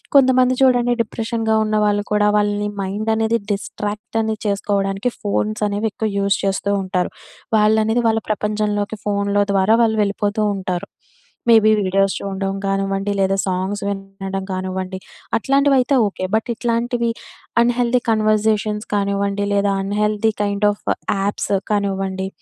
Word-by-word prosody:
కొంతమంది 255 -2 +5
చూడండి. 245 -2 +4
డిప్రెషన్‌గా 225 0 -1
ఉన్నవాళ్ళు 210 -1 +1
కూడా 210 0 +3
వాళ్ళని 205 0 0
మైండనేది 220 +3 0
డిస్ట్రాక్ట్ 210 +3 -5
అనేది 220 -1 -2
చేసుకోవడానికి 200 +1 0
ఫోన్స్ 210 +1 -1
అనేవి 205 +2 -1
ఎక్కువ 220 0 -2
యూజ్ 200 0 +2
చేస్తూ 195 +1 -1
ఉంటారు. 185 -1 -1 0.5
వాళ్ళనేది 220 +2 +3
వాళ్ళ 225 0 +1
ప్రపంచంలోకి 210 0 -1
ఫోనులో 200 0 +1
ద్వారా 195 +3 +3
వాళ్ళు 220 -1 +1
వెళ్ళిపోతూ 205 +1 -1
ఉంటారు. 185 -2 -3 0.6
మేబీ 220 -1 +6
వీడియోస్ 195 +1 +2
చూడడం 195 0 -3
కానివ్వండి. 195 0 -1
లేదా 195 0 +2
సాంగ్స్ 190 +2 -2
వినడం 195 -1 -5
కానివ్వండి. 185 0 -3 0.4
అట్లాంటివైతే 275 +1 +3
ఓకే. 190 -2 -6
బట్ 220 +2 +1
ఇట్లాంటివి 235 +1 -1 0.5
అన్‌హెల్దీ 245 +1 +2
కన్వర్జేషన్స్ 215 -1 +1
కానివ్వండి. 200 0 0
లేదా 200 0 +2
అన్‌హెల్దీ 210 +2 +1
కైండ్ 205 +1 +1
ఆఫ్ 205 - -10 0.4
యాప్స్ 200 +1 -2 0.2
కానివ్వండి. 195 -2 -1
205 Hz, 120 wpm, -20 LUFS, 195-220 Hz, 0.6 s, మేబీ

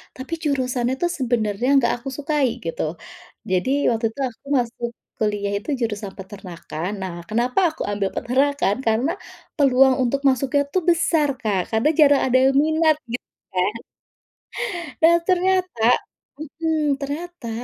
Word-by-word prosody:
tapi 260 +5 -7
jurusannya 255 -4 0
tuh 350 - +2
sebenarnya 235 -3 0
enggak 235 -4 +4
aku 255 +3 -11
sukai 290 -1 +1 0.2
gitu. 165 - -3 0.7
Jadi 185 +6 +1 0.2
waktu 230 -1 0
itu 255 - -15
aku 240 +4 -21
masuk 240 -1 -2 0.3
kuliah 205 -2 -1
itu 210 +7 -8
jurusan 210 -3 -3
peternakan. 180 -4 -7
Nah, 190 -2 -4 0.2
kenapa 240 - +1
aku 315 - -10
ambil 200 -1 -1
peternakan? 260 -3 +1
Karena 225 +6 +2 0.5
peluang 265 -2 +5
untuk 255 +3 0
masuknya 270 +2 +1
tuh 370 - +2
besar, 330 -3 +3
Kak, 210 -5 0
karena 220 +4 +2
jarang 285 -2 +6
ada 255 0 +3
yang 270 0 +3
minat 315 0 +3 0.2
gitu 245 - -3 0.3
kan. 185 +3 +1 1.3
Dan 335 +1 +6
ternyata 370 - +1 0.8
mmm, 310 -3 +1
ternyata, 290 -1 -5
255 Hz, 135 wpm, -22 LUFS, 220-295 Hz, 1.3 s, jarang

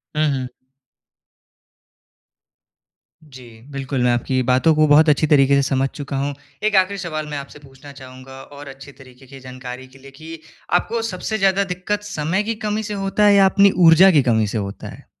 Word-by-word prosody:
हुँ, 155 0 +1
हुँ। 130 -1 -4 2.8
जी, 125 -6 -15
बिल्कुल 135 -2 -3
मैं 125 - +2
आपकी 130 +2 -1
बातों 130 +6 +2
को 155 0 +3
बहुत 150 +2 +5
अच्छी 150 +1 +2
तरीके 140 -2 +3
से 140 - +3
समझ 135 0 0
चुका 140 -1 -7
हूँ। 140 +1 -2 0.3
एक 215 -1 0
आख़िरी 190 +1 +2
सवाल 155 -4 -5
मैं 150 -1 -6
आपसे 140 +1 -10
पूछना 140 0 -15
चाहूँगा 130 -1 -13
और 145 0 -13
अच्छी 135 +1 -12
तरीके 130 -1 -18
की 135 +1 -13
जानकारी 130 0 -10
के 135 +1 -20
लिए 135 +1 -15
कि 160 +4 -11 0.3
आपको 225 +6 0
सबसे 185 +4 -4
ज़्यादा 195 -1 +1
दिक्कत 205 +3 -4
समय 190 -1 -2
की 225 +2 -3
कमी 210 +1 -2
से 210 0 -6
होता 195 +1 -1
है? 205 - +5
या 195 -1 +5
अपनी 200 +1 +4 0.2
ऊर्जा 175 +4 +7
की 150 -5 +4
कमी 110 -3 +1
से 105 - -4
होता 100 -1 -6
है? - - -13
145 Hz, 190 wpm, -19 LUFS, 130-185 Hz, 2.8 s, ऊर्जा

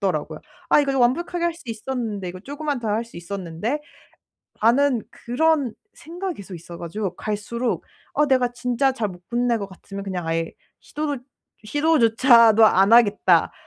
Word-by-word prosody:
받더라고요. - - -2 0.3
'아 - - +6
이거 275 -1 0
더 270 - 0
완벽하게 340 +8 +1
할 340 -1 0
수 335 - -15
있었는데. 225 -4 -4
이거 185 +1 -8
쪼금만 285 +1 -4
더 225 - -3
할 215 +3 0
수 230 - -15
있었는데.'라는 195 - -5 1.1
그런 275 0 0 0.2
생각이 355 +3 -6
계속 195 -1 -9
있어 170 0 -10
가지고 185 +2 -4
갈수록 220 +4 -3 0.3
어 295 - +3
내가 255 -3 +3
진짜 250 +2 0
잘 225 -5 -2
못 175 -1 -13
끝낼 240 -1 +1
것 200 - -4
같으면 195 +1 -9
그냥 180 -4 -4
아예 165 0 -1 0.3
시도도 295 -2 -4 0.5
'시도조차도 230 -5 +5
안 195 +1 +4
하겠다.' 205 -7 +4
235 Hz, 340 characters per minute, -23 LUFS, 200-275 Hz, 1.1 s, 아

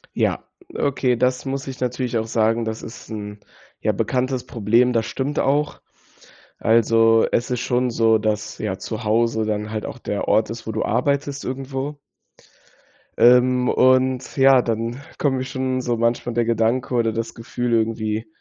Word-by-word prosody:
Ja, - - 0 0.3
okay, 130 -3 +1
das 125 +1 0
muss 135 0 -3
ich 135 -1 -7
natürlich 125 -1 -1
auch 110 - -4
sagen. 115 +1 +1
Das 110 0 -5
ist 115 - -10
'n, 105 -1 -7 0.4
ja, - - +2
bekanntes 130 0 -1
Problem. 120 +3 +2
Das 115 0 0
stimmt 140 +3 -2
auch. 145 +2 0 0.8
Also, 115 0 +4
es 120 - 0
ist 125 - 0
schon 125 0 0
so, 115 -1 +3
dass, 105 -1 -2
ja, 100 -3 -3
zu 110 -2 -5
Hause 110 0 +1
dann 105 0 -2
halt 110 -1 -4
auch 125 - -7
der 105 -3 -3
Ort 110 0 +2
ist, 115 0 -7
wo 110 - -3
du 110 - -2
arbeitest 140 +4 -1
irgendwo. 135 +2 -4 1.2
Ähm, 125 +1 +5
und 130 0 +2
ja, 135 -1 +6
dann 115 +3 -3 0.2
kommt 135 -3 +1
mir 130 - -2
schon 130 -1 -2
so 120 -2 -1
manchmal 115 +1 0
der 120 0 +1
Gedanke 115 +2 0
oder 115 -1 +2
das 115 0 -4
Gefühl 120 +1 -4
irgendwie: 110 -1 -1
120 Hz, 165 wpm, -22 LUFS, 110-130 Hz, 1.2 s, ja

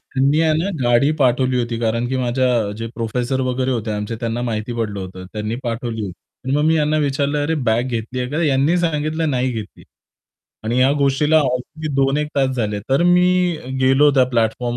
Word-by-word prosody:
त्यांनी 140 +4 +2
आहे 160 -1 +3
ना 185 +4 -1
गाडी 120 +4 +3
पाठवली 130 -1 +2
होती, 120 -1 -2
कारण 115 +1 0
की 130 - -1
माझ्या 130 +1 +1 0.3
जे 115 - -4
प्रोफेसर 125 +3 -2
वगैरे 130 0 -1
होते 115 -3 -2
आमचे, 105 +2 -3
त्यांना 115 +1 -2
माहिती 115 0 -3
पडलं 105 -3 -2
होतं, 95 0 -8
त्यांनी 105 +1 -3
पाठवली 115 -1 -3
होती. 95 - -5 0.3
आणि 135 +2 0
मग 150 - +1
मी 160 +1 +3
यांना 155 0 +1
विचारलं, 145 0 0
"अरे, 160 +2 0
बॅग 115 +2 +2
घेतली 120 +2 -4
आहे 125 +1 -3
का?" 160 +3 -1
यांनी 145 +4 +2
सांगितलं, 155 -1 -1
"नाही 130 0 0
घेतली." 110 -3 -8 0.8
आणि 120 +3 0
या 130 +2 +4
गोष्टीला 140 +3 +2
ऑलरेडी 135 +4 -3
2-1 140 +2 +1
तास 135 -1 +2
झाले. 105 -3 -1
तर 135 +5 +2
मी 180 0 +4 0.6
गेलो 135 +3 +5
त्या 130 -2 +5
प्लॅटफॉर्म 120 +1 0
130 Hz, 190 wpm, -19 LUFS, 115-145 Hz, 0.8 s, गेलो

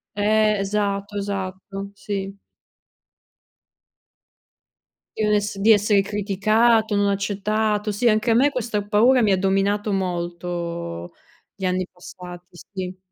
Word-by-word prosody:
Eh, 215 0 +2
esatto, 200 0 -2
esatto, 195 0 -5
sì. 195 -1 -5 2.8
Di - - -3
non 210 0 +2
ess 205 -1 0
di 220 +3 +5
essere 205 -1 +4
criticato, 215 +2 +2
non 200 0 +2
accettato, 210 +2 0
sì 230 +4 +2
anche 215 +2 +2
a - - +5
me 270 +5 +4
questa 230 -6 -2
paura 230 +5 +4
mi 210 -3 +3
ha 190 - +3
dominato 200 +2 +1
molto, 170 - -4 0.4
gli 195 - -6
anni 185 0 0
passati, 180 0 -11
sì. 185 +1 -8
200 Hz, 120 wpm, -22 LUFS, 190-215 Hz, 2.8 s, di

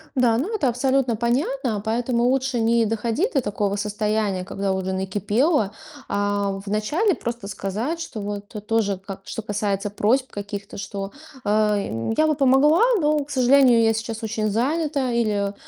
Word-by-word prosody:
Да, 245 -3 +3
ну, 345 - -2
это 305 -11 +1
абсолютно 260 0 +1
понятно. 240 -1 -1
Поэтому 235 +2 0
лучше 260 0 +1
не 230 0 +3
доходить 225 - -1
до 275 - +2
такого 205 -2 -1
состояния, 210 -2 -1
когда 195 0 -2
уже 190 0 -2
накипело, 205 - +1 0.4
а 200 -1 -1
в - - -19
начале 295 - +1
просто 235 -4 -5
сказать, 210 - -3
что 225 - -6
вот 205 0 -5 0.2
тоже 215 -3 +1
ка 195 +1 -9
что - - -5
касается 205 -1 -1
просьб 250 +6 +1
каких-то, 200 0 -6
что, 195 0 -5 0.3
э, - - 0
м: 210 - +1
"Я 310 - +4
бы 305 - +2
помогла, 280 +5 +4 0.2
но, 300 -1 +2
к 280 - -18
сожалению, 255 -3 +5
я 225 0 +4
сейчас 225 +1 -4
очень 215 -1 -1
занята". 275 +4 0
Или: 210 -4 0
225 Hz, 160 wpm, -23 LUFS, 205-260 Hz, 0.4 s, сожалению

